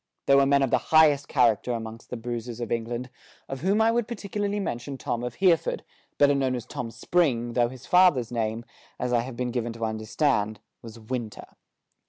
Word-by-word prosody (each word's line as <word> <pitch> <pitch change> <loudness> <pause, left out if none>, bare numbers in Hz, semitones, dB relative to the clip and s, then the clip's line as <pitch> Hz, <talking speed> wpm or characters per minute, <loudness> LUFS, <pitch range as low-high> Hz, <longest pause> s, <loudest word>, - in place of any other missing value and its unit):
There 140 - +5
were 140 0 +4
men 140 0 +4
of 135 - 0
the - - +4
highest 150 -3 +5
character 120 -2 +2
amongst 115 -1 -7
the 125 - -4
bruisers 120 0 -5
of 120 -2 -5
England, 120 +2 -3 0.4
of 135 -1 -6
whom 195 +5 +2
I 225 +1 +4
would 235 -1 0
particularly 205 -2 -3
mention 135 -6 -4
Tom 120 -1 -3
of 125 -1 -4
Hereford, 180 -4 +2 0.3
better 145 0 +5
known 135 -2 0
as 120 - -5
Tom 120 - -5
Spring, 120 -4 0
though 120 -1 +2
his 130 0 -12
father's 175 -11 +4
name, 115 0 -2 0.3
as 125 0 -1
I 120 - +4
have 120 0 -5
been 125 -1 -2
given 120 -1 -2
to 115 0 -3
understand, 110 0 0 0.2
was 115 0 -10
Winter. 115 -1 -5
125 Hz, 195 wpm, -26 LUFS, 115-145 Hz, 0.4 s, There